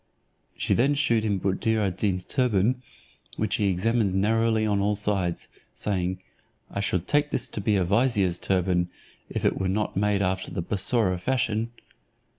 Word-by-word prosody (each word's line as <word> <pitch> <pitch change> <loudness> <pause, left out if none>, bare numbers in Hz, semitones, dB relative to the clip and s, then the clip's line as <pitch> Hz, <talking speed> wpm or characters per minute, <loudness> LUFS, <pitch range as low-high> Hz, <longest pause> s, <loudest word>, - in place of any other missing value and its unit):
She - - 0
then 140 +4 +3
shewed 120 -6 +2
him 105 -2 +1
Buddir 105 +4 0
ad 95 -4 0
Deen's 90 -3 0
turban, 125 -1 +1 0.6
which - - 0
he 105 - +1
examined 100 +1 +1
narrowly 110 +2 +2
on 105 -2 +1
all 105 +1 +1
sides, 100 -4 -1 0.3
saying, 95 -2 -1 0.5
"I - - -3
should 90 -3 0
take 145 0 +2
this - - 0
to 105 - -4
be 105 +1 +2
a 95 - +2
vizier's 100 -3 +2
turban, 90 -2 +1 0.4
if - - -3
it - - +2
were 95 -1 0
not 105 +3 -1
made 100 0 +1
after 95 0 -1
the 85 - -3
Bussorah 95 -1 +1
fashion." 115 0 0
100 Hz, 165 wpm, -26 LUFS, 95-115 Hz, 0.6 s, then